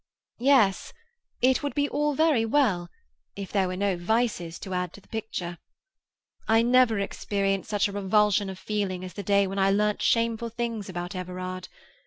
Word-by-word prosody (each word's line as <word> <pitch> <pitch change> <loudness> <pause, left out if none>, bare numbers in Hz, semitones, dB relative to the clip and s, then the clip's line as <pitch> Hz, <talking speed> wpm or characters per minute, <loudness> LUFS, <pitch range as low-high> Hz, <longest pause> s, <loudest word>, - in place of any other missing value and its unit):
"Yes, 240 -7 +3 0.5
it 255 0 +4
would 285 -1 -3
be 285 -1 +2
all 295 0 0
very 310 -6 +3
well, 220 -8 +1 0.5
if 200 -1 -7
there 195 -2 +2
were 185 - -3
no 200 -1 +1
vices 175 -3 -1
to 190 - -6
add 180 -1 -2
to - - -12
the - - -26
picture. 180 -6 -5 0.9
I 225 +1 +4
never 245 -2 +4
experienced 195 -1 -2
such 205 -2 +1
a - - -6
revulsion 205 0 +2
of 190 - -7
feeling 190 -3 -3
as 185 - -9
the 205 - -5
day 200 +1 +3
when 195 +1 -3
I 195 0 +4
learnt 210 +1 +1
shameful 230 0 +1
things 230 -3 -4
about 175 +1 -5
Everard. 185 0 -5
200 Hz, 175 wpm, -26 LUFS, 185-230 Hz, 0.9 s, it